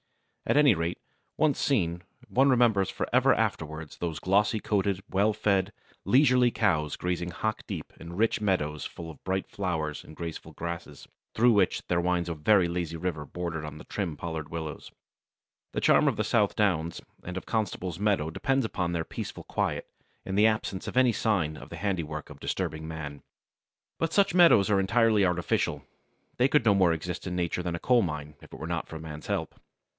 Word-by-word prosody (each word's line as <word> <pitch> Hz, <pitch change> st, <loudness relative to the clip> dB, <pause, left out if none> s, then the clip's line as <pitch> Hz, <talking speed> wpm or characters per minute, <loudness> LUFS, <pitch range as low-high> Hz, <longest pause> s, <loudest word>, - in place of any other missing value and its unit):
At -, -, +3 dB
any 145 Hz, -5 st, +7 dB
rate, 85 Hz, 0 st, -2 dB, 0.4 s
once 155 Hz, -3 st, +2 dB
seen, 90 Hz, -10 st, +1 dB, 0.3 s
one 135 Hz, +2 st, +3 dB
remembers 115 Hz, -7 st, +3 dB
for -, -, -3 dB
ever -, -, +5 dB
afterwards 80 Hz, -1 st, -3 dB
those 85 Hz, -3 st, -3 dB
glossy 100 Hz, +6 st, +2 dB
coated, 100 Hz, -2 st, 0 dB
well 100 Hz, +3 st, +3 dB
fed, 100 Hz, -2 st, +1 dB, 0.3 s
leisurely 125 Hz, -2 st, +5 dB
cows 80 Hz, -10 st, +1 dB
grazing 90 Hz, -1 st, -2 dB
hock 110 Hz, +5 st, -2 dB
deep -, -, -6 dB
in 85 Hz, +1 st, -9 dB
rich 115 Hz, 0 st, +2 dB
meadows 75 Hz, -8 st, 0 dB
full 85 Hz, -1 st, -7 dB
of 75 Hz, -, -17 dB
bright 95 Hz, 0 st, -1 dB
flowers 80 Hz, -6 st, -3 dB
and 80 Hz, -, -13 dB
graceful 85 Hz, -1 st, -7 dB
grasses, 85 Hz, -4 st, -6 dB, 0.3 s
through 120 Hz, +1 st, +5 dB
which 100 Hz, -3 st, +2 dB
there 85 Hz, -1 st, +1 dB
winds 90 Hz, -1 st, 0 dB
a 85 Hz, -, -2 dB
very 85 Hz, +4 st, +3 dB
lazy 85 Hz, -1 st, -3 dB
river 80 Hz, -3 st, -3 dB
bordered 85 Hz, +1 st, -4 dB
by 75 Hz, 0 st, -8 dB
trim 90 Hz, -7 st, -3 dB
pollarded 80 Hz, -2 st, -5 dB
willows. 80 Hz, -2 st, -6 dB, 0.8 s
The -, -, -1 dB
charm -, -, +4 dB
of -, -, +1 dB
the -, -, +1 dB
South -, -, +2 dB
Downs 85 Hz, -6 st, +1 dB, 0.2 s
and 90 Hz, +1 st, -5 dB
of -, -, -6 dB
Constable's 95 Hz, -5 st, -2 dB
meadows 100 Hz, -7 st, +1 dB
depends 135 Hz, -, +1 dB
upon 90 Hz, -5 st, -2 dB
their 85 Hz, -2 st, -2 dB
peaceful -, -, -6 dB
quiet, -, -, -2 dB, 0.4 s
and 95 Hz, -, -3 dB
the 105 Hz, +2 st, +6 dB
absence 110 Hz, -3 st, -2 dB
of -, -, -4 dB
any 130 Hz, -2 st, +5 dB
sign 90 Hz, -11 st, 0 dB
of -, -, -11 dB
the -, -, -7 dB
handiwork 80 Hz, -7 st, -3 dB
of -, -, -12 dB
disturbing 80 Hz, -4 st, -3 dB
man. 75 Hz, -3 st, -6 dB, 0.8 s
But 165 Hz, -1 st, 0 dB
such 200 Hz, -1 st, +3 dB
meadows 170 Hz, -, +6 dB
are 100 Hz, -, +4 dB
entirely 110 Hz, +1 st, +3 dB
artificial. 90 Hz, -2 st, 0 dB, 0.5 s
They 125 Hz, -, +4 dB
could 140 Hz, -3 st, +2 dB
no 105 Hz, -, +6 dB
more 95 Hz, -3 st, +4 dB
exist 85 Hz, +3 st, -4 dB
in 90 Hz, -, -3 dB
nature 90 Hz, 0 st, -1 dB
than 85 Hz, -1 st, -2 dB
a -, -, -5 dB
coal 125 Hz, +4 st, +4 dB
mine, 75 Hz, -5 st, -4 dB
if -, -, -15 dB
it -, -, -10 dB
were -, -, -5 dB
not 85 Hz, -1 st, -2 dB
for 80 Hz, -, -7 dB
man's 75 Hz, -1 st, -8 dB
help. -, -, -2 dB
90 Hz, 190 wpm, -28 LUFS, 80-105 Hz, 0.8 s, any